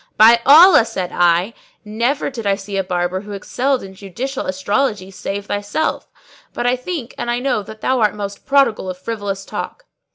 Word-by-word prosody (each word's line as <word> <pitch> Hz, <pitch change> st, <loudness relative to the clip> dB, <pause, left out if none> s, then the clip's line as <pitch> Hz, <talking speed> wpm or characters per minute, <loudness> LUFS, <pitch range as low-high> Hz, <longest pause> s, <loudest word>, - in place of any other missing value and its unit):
"By 230 Hz, +2 st, +7 dB
Allah," 315 Hz, 0 st, +8 dB
said 190 Hz, -6 st, -4 dB
I, 175 Hz, +5 st, +2 dB, 0.3 s
"never 235 Hz, +8 st, -1 dB
did 230 Hz, -5 st, -5 dB
I 200 Hz, -, +3 dB
see 195 Hz, 0 st, -7 dB
a 195 Hz, -, 0 dB
barber 180 Hz, 0 st, -2 dB
who 210 Hz, 0 st, -9 dB
excelled 255 Hz, +7 st, -1 dB
in 190 Hz, 0 st, -10 dB
judicial 235 Hz, +8 st, -5 dB
astrology 200 Hz, +1 st, -1 dB
save 200 Hz, +1 st, -5 dB
thyself: 205 Hz, +8 st, -2 dB, 0.5 s
but 240 Hz, -, -3 dB
I 245 Hz, +1 st, +3 dB
think 255 Hz, -1 st, -6 dB
and 240 Hz, -, -3 dB
I 240 Hz, -, +1 dB
know 250 Hz, -4 st, 0 dB
that 220 Hz, +2 st, -11 dB
thou 260 Hz, -1 st, +1 dB
art 215 Hz, -2 st, +2 dB
most 200 Hz, -1 st, -6 dB
prodigal 270 Hz, -9 st, +2 dB
of 185 Hz, -, -5 dB
frivolous 200 Hz, -1 st, -5 dB
talk. -, -, -6 dB
210 Hz, 185 wpm, -18 LUFS, 195-250 Hz, 0.5 s, Allah